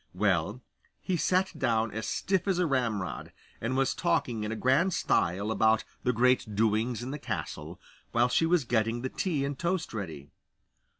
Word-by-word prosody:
Well, - - 0 0.4
he 185 - -1
sat 185 +3 +2
down 115 -3 +1
as 110 +1 -4
stiff 190 - 0
as 190 -2 +2
a 180 - +2
ramrod, 115 - -1 0.3
and 125 +3 -1
was 135 -1 +2
talking 145 -10 0
in 105 - -3
a - - -2
grand 150 +10 +2
style 100 - +1
about 110 0 +3 0.2
the 125 - +2
great 125 -2 +2
doings 110 +2 +1
at 130 - -4
the 150 - -5
castle, - - -5 0.3
while 120 +1 +3
she 165 +6 +2
was 170 -3 +3
getting 120 0 0
the 130 - -1
tea 150 -5 -1
and 140 -1 -4
toast 170 -4 -1
ready. 80 -9 -6
125 Hz, 175 wpm, -29 LUFS, 110-160 Hz, 0.4 s, about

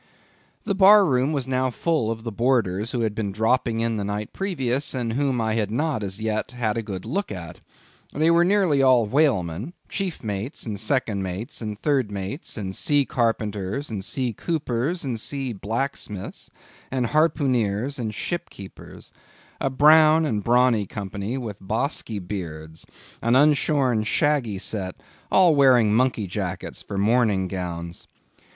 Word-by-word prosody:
The 205 - -1
bar 200 +1 +7
room 130 -2 +1
was 140 -4 -2
now 130 0 +1
full 140 -1 0
of 115 0 -4
the 115 - -4
boarders 110 -3 +1
who 125 -2 -2
had 110 -2 0
been 105 -2 -3
dropping 115 +2 +1
in 115 -1 0
the 105 - -2
night 105 +1 -4
previous, 140 -9 -2
and 120 -3 -2
whom 135 -1 0
I 110 -1 0
had 110 -3 0
not 135 +2 -1
as 100 0 -3
yet 110 0 -2
had 120 -4 -2
a 115 - -1
good 100 -4 -6
look 195 - -2
at. 85 -5 -7 0.5
They 155 +3 +2
were 170 +1 +5
nearly 180 -7 +3
all 130 -4 +5
whalemen; 115 - 0 0.2
chief 190 -8 -3
mates, 105 +6 -4
and 105 -4 -4
second 110 -3 0
mates, 105 - -5
and 105 -2 -5
third 135 -6 +1
mates, 100 - -5
and 95 -3 -4
sea 145 -2 +2
carpenters, 110 +1 -2
and 100 -3 -4
sea 125 +2 -2
coopers, 150 - -2
and 125 -5 -3
sea 135 +1 -3
blacksmiths, 105 -1 -4 0.4
and 130 -2 -1
harpooneers, 135 -5 +1
and 110 -3 -2
ship 175 +7 -3
keepers; 95 -1 -12 0.5
a 135 - 0
brown 155 +3 +6
and 105 -8 -1
brawny 120 -3 +3
company, 100 +4 -4
with 110 -6 -6
bosky 110 +2 -1
beards; 80 -5 -6 0.3
an 115 +2 +2
unshorn, 140 -4 +3
shaggy 120 -2 +1
set, 95 -1 -3 0.4
all 180 -4 +6
wearing 125 -7 +5
monkey 120 -2 +2
jackets 90 - -5
for 100 - -6
morning 105 -2 +2
gowns. 85 -2 -6
115 Hz, 160 wpm, -24 LUFS, 105-140 Hz, 0.5 s, bar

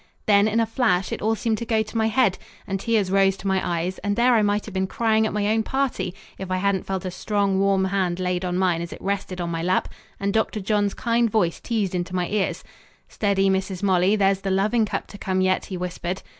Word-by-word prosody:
Then 205 0 +5
in 220 +1 +1
a 230 - +3
flash 220 -5 +1
it - - -4
all 220 +2 +1
seemed 220 0 -1
to - - -3
go 220 -1 +1
to 215 - -13
my 220 -1 +2
head, 220 -4 +2 0.3
and 195 0 -3
tears 210 -3 0
rose 195 0 +3
to - - -12
my 190 -1 +2
eyes, 175 +2 -2
and 205 +1 -1
there 245 +2 +4
I 225 - +4
might 205 0 +1
have 215 - -9
been 190 0 0
crying 220 +1 +1
at - - -4
my 210 -1 -1
own 220 +1 +2
party 220 -8 -2 0.2
if 190 -1 -6
I 185 - 0
hadn't 195 0 0
felt 190 -1 -3
a 185 - -3
strong 200 0 0
warm 195 -1 +2
hand 185 -2 -1
laid 180 0 -1
on 180 -1 -1
mine 180 -3 +1
as 170 - -6
it - - -8
rested 195 -2 -3
on 170 -1 -2
my 165 0 -2
lap 180 +2 +1 0.3
and 200 0 -1
Dr. 220 -1 0
John's 205 0 0
kind 235 -1 +1
voice 195 -6 +1
teased 215 -6 -2
into 180 0 -3
my 180 -1 0
ears 210 -2 -1 0.5
"Steady, 200 -2 +1
Mrs. 190 0 -1
Molly, 190 +1 +3
there's 195 -2 +2
the 195 - -2
loving 210 +4 +2
cup - - -3
to 205 - -12
come 185 -1 -1
yet," 185 0 +1
he 185 - -5
whispered. 180 +1 -4
195 Hz, 245 wpm, -23 LUFS, 185-215 Hz, 0.5 s, Then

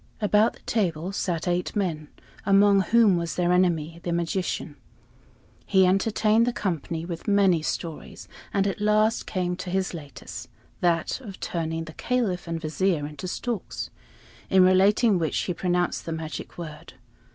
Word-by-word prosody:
About 210 +1 +3
the - - -19
table 180 -5 -1
sat 175 -3 -2
eight 175 +3 -1
men, 165 -7 -1 0.4
among 200 0 +5
whom 215 -2 +4
was 170 -1 -3
their 175 -1 +1
enemy, 170 -3 +1
the 175 - -3
magician. 170 +2 -2 0.9
He 190 -2 +5
entertained 215 +4 +3
the - - +2
company 165 -4 -3
with 170 -1 -6
many 195 -5 +4
stories, 160 0 -5 0.2
and 195 -1 +1
at 200 +1 -2
last 215 +2 +2
came 180 -2 -1
to 185 - -6
his 190 +1 -1
latest 145 -5 -8 0.3
that 170 +3 +1
of 200 -7 -9
turning 165 -1 -3
the 160 -1 -10
Caliph 215 -8 -1
and 165 0 -2
Vizier 160 0 0
into 150 +5 -7
storks 230 +2 -4 0.6
in 190 -1 +6
relating 195 +2 +4
which 160 -2 -1
he 180 - -2
pronounced 175 0 -1
the - - -2
magic 160 -1 -6
word. 155 -3 -8
180 Hz, 150 wpm, -25 LUFS, 165-200 Hz, 0.9 s, in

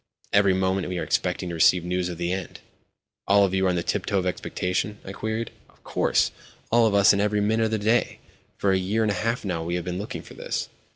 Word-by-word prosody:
Every 100 -2 +4
moment 95 0 0
we 90 - -3
are - - -2
expecting 90 - -1
to - - -4
receive 85 +1 +4
news 90 0 -1
of 85 - -6
the 85 +1 -1
end." 95 -3 -6 0.7
"All 100 0 +5
of 95 - -2
you 95 0 +2
are - - +3
on 90 - +1
the 85 - -1
tiptoe 100 - -1
of 95 - 0
expectation?" 90 +3 -2
I 95 - -6
queried. 110 +3 -3 0.2
"Of - - -27
course—all 115 0 0
of 105 - +1
us, 100 0 +6
and 100 - +1
every 105 0 +1
minute 110 +2 +2
of - - 0
the 110 - 0
day. 110 +3 +1 0.4
For 100 - +1
a 95 - +2
year 105 +5 0
and 105 - +1
a - - 0
half 115 +4 -2
now 85 -4 -2
we 85 +1 -2
have 90 - -3
been 90 0 -3
looking 105 - -6
for - - -13
this." - - -4
95 Hz, 245 wpm, -25 LUFS, 90-105 Hz, 0.7 s, us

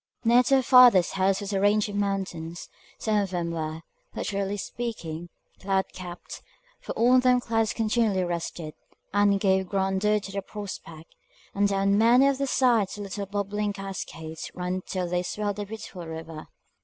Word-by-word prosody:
Near 240 +1 +6
to 270 +2 +3
her 265 - +4
father's 245 -8 +7
house 190 +1 +1
was 200 0 -4
a 195 - +1
range 205 +1 +3
of 205 - -6
mountains; 190 -4 -3 0.3
some 215 -1 0
of 200 -2 0
them 175 -2 -2
were, 160 0 -4 0.3
literally 200 0 -2
speaking, 175 -8 -5 0.3
cloud 190 0 -1
capt, 180 -1 -9 0.4
for - - -7
on 250 +2 +5
them 250 0 +4
clouds 225 -2 0
continually 220 -4 +1
rested, 170 -2 -4 0.4
and 205 -1 +3
gave 190 -2 +2
grandeur 195 +2 +1
to 200 -1 -8
the 200 0 -3
prospect; 185 -6 -9 0.4
and 200 +1 +2
down 200 0 +2
many 240 +4 +6
of 275 -1 +1
their 275 - 0
sides 240 -7 +2
the 210 - -7
little 200 0 -5
bubbling 205 +1 -2
cascades 175 -5 -7
ran 180 +1 -2
till 185 -2 -2
they 180 +1 0
swelled 205 +2 -3
a 205 - -4
beautiful 190 -5 -8
river. 160 -1 -8
200 Hz, 170 wpm, -26 LUFS, 180-215 Hz, 0.4 s, father's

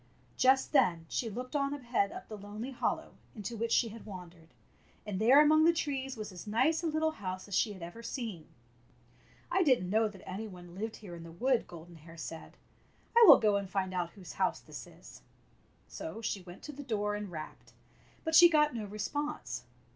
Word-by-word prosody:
Just 265 +1 +4
then 175 - +3
she 230 - -1
looked 250 +6 -6
on 280 0 +1
ahead 240 -7 0
up - - -9
the 215 - -7
lonely 210 +5 -7
hollow 255 - -2 0.2
into 215 +2 -5
which 230 +1 -2
she 230 - +3
had 225 +2 -10
wandered, 180 -5 -10 0.6
and 205 -1 -3
there 255 +6 +7
among 310 +1 +6
the 335 - +7
trees 270 -5 -3
was 215 -1 -6
as 180 +2 -10
nice 260 +10 +2
a 340 - -1
little 315 0 +1
house 185 -8 -6
as 200 - -9
she 210 +1 +2
had 185 -3 -10
ever 175 +7 -8
seen. 230 - -5 1.0
"I 375 - +3
did 260 - +4
n't 180 - -4
know 220 +1 +3
that 200 -3 -12
any 205 +4 -4
one 175 -3 -11
lived 215 +4 -4
here 195 -5 -10
in 170 - -9
the 165 0 -10
wood," 245 +8 +1
Golden 170 0 -11
Hair 165 +2 -14
said. 165 0 -8 0.6
"I 470 - +8
will - - +12
go 210 -2 +3
and 200 -1 -4
And 190 -1 0
out 175 -2 -1
whose 185 -4 -10
house - - 0
this - - -10
is." - - -14 0.7
So 315 -8 -7
she 210 -3 -2
went 175 0 -12
to 300 - -6
the 285 0 -9
door 210 -6 -1
and 205 -1 -4
rapped, 155 -3 -9 0.5
but 320 - -2
she 345 +2 +10
got 300 -3 +4
no 225 -3 -4
response. 210 - -4
215 Hz, 205 wpm, -32 LUFS, 185-270 Hz, 1.0 s, will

